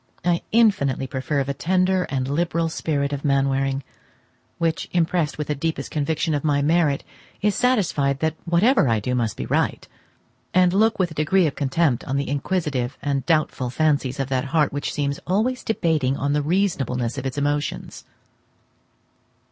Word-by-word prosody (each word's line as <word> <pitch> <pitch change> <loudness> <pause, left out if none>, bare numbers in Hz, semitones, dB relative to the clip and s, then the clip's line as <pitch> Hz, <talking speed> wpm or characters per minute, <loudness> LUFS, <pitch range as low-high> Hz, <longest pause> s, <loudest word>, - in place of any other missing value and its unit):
I 175 -1 +2
infinitely 200 - +3
prefer 135 +2 -1
the 140 +1 -3
tender 185 +4 +1
and 130 -2 -1
liberal 165 +3 0
spirit 145 -3 -1
of 140 - -4
Mainwaring, 135 -1 +1 0.7
which, 165 -1 -1
impressed 170 -2 +1
with 150 - -2
the 150 - -1
deepest 160 +3 -3
conviction 155 +2 -1
of 145 - -1
my 145 -2 +2
merit, 155 -2 +2 0.4
is 210 -1 +3
satisfied 165 - +1
that 160 -1 0
whatever 190 - +3
I 110 -1 +2
do 125 +5 -2
must 115 -4 -1
be - - -4
right; - - -1 0.7
and 180 -1 +4
look 220 +3 +3
with 180 -3 0
a - - -6
degree 160 +5 +2
of 150 - 0
contempt 140 -2 0
on 135 0 -1
the 140 -2 -2
inquisitive 140 -4 -2
and 140 -2 -1
doubtful 155 -5 +1
fancies 140 -1 0
of 135 -1 -2
that 130 0 0
heart 150 +1 +1
which 145 0 -2
seems 140 -1 -2
always 225 +8 0
debating 155 -10 0
on 140 +1 0
the 150 - +1
reasonableness 140 - 0
of 135 - -3
its 130 - -5
emotions. 145 +1 -2
145 Hz, 165 wpm, -23 LUFS, 135-170 Hz, 0.7 s, and